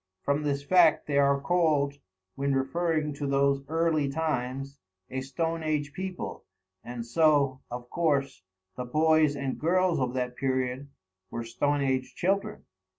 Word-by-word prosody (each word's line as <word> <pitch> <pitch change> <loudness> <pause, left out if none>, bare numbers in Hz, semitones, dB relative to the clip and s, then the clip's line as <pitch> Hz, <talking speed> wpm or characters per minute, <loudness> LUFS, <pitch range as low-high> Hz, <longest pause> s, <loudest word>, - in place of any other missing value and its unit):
From 140 +1 +1
this 140 -1 -1
fact 165 0 +4
they 140 -1 +1
are 140 0 +4
called, 145 -3 +1 0.3
when 140 0 0
referring 155 +2 0
to 140 0 -4
those 140 0 +2
early 160 -2 +1
times, 135 -2 -3 0.3
a 130 - -2
stone 165 +5 -2
age 150 -2 -1
people, 185 +1 -5 0.4
and 120 -1 -6
so, 140 0 +3
of 120 0 -6
course, 140 - 0 0.3
the 125 - -4
boys 155 +2 +3
and 140 -2 -3
girls 180 +1 +2
of 130 -1 -1
that 125 -1 -2
period 130 0 -1 0.4
were 115 - -4
stone 145 +5 0
age 130 -1 -1
children. 195 +3 -1
140 Hz, 145 wpm, -28 LUFS, 135-160 Hz, 0.4 s, fact